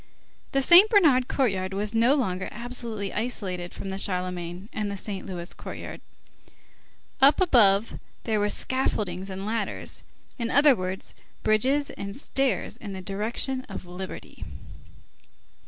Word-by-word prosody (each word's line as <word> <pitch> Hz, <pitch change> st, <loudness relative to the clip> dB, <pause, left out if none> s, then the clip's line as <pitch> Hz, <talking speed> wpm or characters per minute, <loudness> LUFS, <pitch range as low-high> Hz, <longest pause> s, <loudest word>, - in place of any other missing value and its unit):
The 275 Hz, 0 st, +2 dB
Saint 355 Hz, +8 st, +8 dB
Bernard 295 Hz, -, +5 dB
courtyard 190 Hz, -7 st, 0 dB
was 205 Hz, +2 st, -2 dB
no 235 Hz, +5 st, +4 dB
longer 190 Hz, -9 st, -1 dB
absolutely 235 Hz, -3 st, -3 dB
isolated 185 Hz, -7 st, -3 dB
from 195 Hz, -, -7 dB
the 190 Hz, -, -3 dB
Charlemagne 180 Hz, -1 st, 0 dB
and 210 Hz, -2 st, -2 dB
the 200 Hz, -, -4 dB
Saint 195 Hz, 0 st, -5 dB
Louis 175 Hz, -2 st, -6 dB
courts. -, -, -8 dB, 1.2 s
Up 275 Hz, +2 st, +6 dB
above 225 Hz, -, +4 dB, 0.2 s
there 220 Hz, -2 st, 0 dB
were 205 Hz, 0 st, +1 dB
scaffoldings 200 Hz, -8 st, -2 dB
and 190 Hz, +1 st, -5 dB
ladders; 225 Hz, +2 st, -4 dB, 0.4 s
in 230 Hz, -1 st, -1 dB
other 285 Hz, +1 st, +6 dB
words, 185 Hz, -1 st, -5 dB, 0.3 s
bridges 265 Hz, +7 st, +2 dB
and 200 Hz, +3 st, -6 dB
stairs 270 Hz, -7 st, -1 dB
in 205 Hz, -3 st, -7 dB
the 190 Hz, -, -6 dB
direction 225 Hz, +7 st, -1 dB
of 195 Hz, -, -7 dB
liberty. 180 Hz, +2 st, -8 dB
210 Hz, 135 wpm, -26 LUFS, 190-255 Hz, 1.2 s, Saint